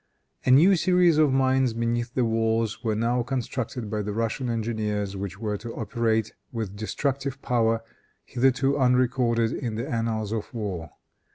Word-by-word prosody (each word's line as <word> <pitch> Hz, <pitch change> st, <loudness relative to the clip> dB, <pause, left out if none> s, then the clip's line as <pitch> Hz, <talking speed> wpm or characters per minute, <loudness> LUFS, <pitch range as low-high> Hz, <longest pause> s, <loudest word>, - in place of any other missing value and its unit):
A -, -, +1 dB
new 165 Hz, +10 st, +7 dB
series 180 Hz, -2 st, +4 dB
of 150 Hz, -3 st, +4 dB
mines 130 Hz, -2 st, +2 dB
beneath 120 Hz, +1 st, -2 dB
the 125 Hz, -, +2 dB
walls 115 Hz, 0 st, 0 dB
were 110 Hz, -2 st, 0 dB
now 120 Hz, +3 st, +1 dB
constructed 125 Hz, -1 st, -3 dB
by 105 Hz, -1 st, -1 dB
the 105 Hz, 0 st, -3 dB
Russian 115 Hz, +3 st, -2 dB
engineers, 105 Hz, -3 st, -2 dB
which 100 Hz, +1 st, -5 dB
were 105 Hz, -1 st, -2 dB
to 115 Hz, +3 st, -8 dB
operate 110 Hz, 0 st, 0 dB, 0.2 s
with 110 Hz, -5 st, -4 dB
destructive 135 Hz, +5 st, -2 dB
power, 115 Hz, -2 st, +1 dB, 0.4 s
hitherto 135 Hz, +2 st, +1 dB
unrecorded 125 Hz, -2 st, +2 dB
in 115 Hz, -5 st, -3 dB
the 115 Hz, -, -3 dB
annals 115 Hz, -2 st, -2 dB
of 110 Hz, -2 st, -3 dB
war. 95 Hz, -8 st, -4 dB
115 Hz, 155 wpm, -26 LUFS, 110-130 Hz, 0.4 s, new